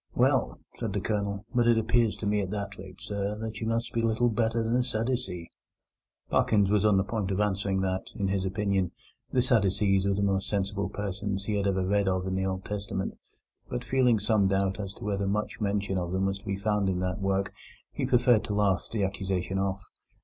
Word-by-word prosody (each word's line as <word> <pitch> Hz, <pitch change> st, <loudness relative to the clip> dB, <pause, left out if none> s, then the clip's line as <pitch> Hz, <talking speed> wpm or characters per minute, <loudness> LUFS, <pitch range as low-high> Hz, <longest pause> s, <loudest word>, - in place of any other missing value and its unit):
"Well," -, -, +2 dB, 0.2 s
said -, -, -3 dB
the -, -, 0 dB
Colonel, 100 Hz, -1 st, -2 dB
"but 120 Hz, -2 st, +3 dB
it 120 Hz, -1 st, +5 dB
appears 115 Hz, 0 st, +2 dB
to -, -, -5 dB
me 105 Hz, 0 st, +2 dB
at 95 Hz, -, -3 dB
that 100 Hz, -1 st, -4 dB
rate, 95 Hz, -1 st, -10 dB
sir, 100 Hz, 0 st, -3 dB
that 110 Hz, -1 st, -5 dB
you 110 Hz, -, -1 dB
must 115 Hz, +1 st, -1 dB
be 115 Hz, -, +1 dB
little 115 Hz, +1 st, +2 dB
better 115 Hz, +1 st, +1 dB
than 115 Hz, +2 st, +1 dB
a 125 Hz, -, +2 dB
Sadducee." 115 Hz, -7 st, -2 dB, 0.8 s
Parkins 100 Hz, -3 st, +3 dB
was 105 Hz, -1 st, +3 dB
on 105 Hz, -2 st, +4 dB
the 95 Hz, -, +3 dB
point 100 Hz, -1 st, -2 dB
of 95 Hz, 0 st, -1 dB
answering 100 Hz, -2 st, +1 dB
that, 95 Hz, 0 st, -1 dB
in 100 Hz, -, -1 dB
his 95 Hz, -1 st, 0 dB
opinion, 95 Hz, -2 st, 0 dB, 0.4 s
the 125 Hz, -, +3 dB
Sadducees 100 Hz, -4 st, +3 dB
were 100 Hz, -, +2 dB
the 100 Hz, -, 0 dB
most 95 Hz, -1 st, +1 dB
sensible 100 Hz, 0 st, -1 dB
persons 100 Hz, 0 st, -3 dB
he 105 Hz, -, -1 dB
had 100 Hz, -1 st, +1 dB
ever 95 Hz, -1 st, +1 dB
read 100 Hz, +1 st, +2 dB
of 95 Hz, -1 st, +1 dB
in 95 Hz, -, -2 dB
the 95 Hz, 0 st, 0 dB
Old 95 Hz, 0 st, -3 dB
Testament; 100 Hz, -2 st, -3 dB, 0.5 s
but, 125 Hz, 0 st, -3 dB
feeling 125 Hz, -3 st, +3 dB
some 105 Hz, -1 st, +2 dB
doubt 95 Hz, +1 st, +1 dB
as 100 Hz, -1 st, -5 dB
to -, -, -11 dB
whether 100 Hz, -1 st, -1 dB
much 105 Hz, +2 st, -2 dB
mention 100 Hz, -2 st, 0 dB
of 85 Hz, -1 st, -3 dB
them 95 Hz, +1 st, +1 dB
was 95 Hz, 0 st, -1 dB
to 100 Hz, -, -21 dB
be 100 Hz, -2 st, -2 dB
found 105 Hz, -1 st, +1 dB
in 90 Hz, -, 0 dB
that 90 Hz, +1 st, -2 dB
work, 95 Hz, 0 st, 0 dB, 0.4 s
he -, -, -2 dB
preferred 120 Hz, -3 st, +4 dB
to 105 Hz, -, -2 dB
laugh 100 Hz, -3 st, +2 dB
the 110 Hz, -3 st, 0 dB
accusation 95 Hz, -1 st, -1 dB
off. 95 Hz, 0 st, -1 dB
100 Hz, 220 wpm, -28 LUFS, 95-110 Hz, 0.8 s, it